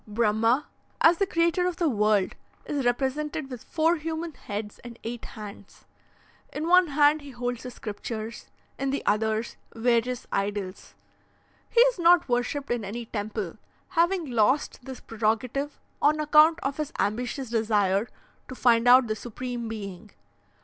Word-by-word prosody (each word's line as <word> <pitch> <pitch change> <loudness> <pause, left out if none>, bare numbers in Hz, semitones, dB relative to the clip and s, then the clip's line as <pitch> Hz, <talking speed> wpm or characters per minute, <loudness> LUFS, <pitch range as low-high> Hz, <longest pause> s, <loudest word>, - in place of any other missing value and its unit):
"Brahma, 225 +5 +2 0.4
as 335 +1 +6
the 395 - +2
creator 340 +1 +2
of 360 - -2
the 340 -1 +1
world, 210 -6 +2 0.3
is 285 -3 -2
represented 275 +3 -1
with 250 -3 -7
four 330 +1 +1
human 320 +1 -4
heads 210 -3 -6
and 240 -1 -11
eight 235 +1 -5
hands; 205 -2 -11 0.7
in 310 +2 -3
one 360 0 +6
hand 295 +1 +3
he 285 - -10
holds 245 -2 -4
the 250 - -6
scriptures, 220 0 -6 0.3
in 275 - -1
the 275 - -2
others, 220 +2 0 0.2
various 240 +1 +1
idols. 200 -1 -3 0.7
He 470 - +5
is - - +4
not 345 0 +5
worshipped 250 +3 -1
in 240 -2 -1
any 230 +4 -5
temple, 210 -3 -4 0.3
having 345 0 +2
lost 245 +4 +1
this 265 -1 -8
prerogative 230 +6 -2 0.2
on 305 +1 +3
account 305 +2 +5
of 275 0 -2
his 305 0 -3
ambitious 245 +4 -2
desire 210 -2 +2 0.4
to 260 - -8
find 235 -1 +3
out 250 +1 +8
the 215 -1 -2
Supreme 240 +1 -5
Being. 210 -2 -7
245 Hz, 150 wpm, -26 LUFS, 220-300 Hz, 0.7 s, out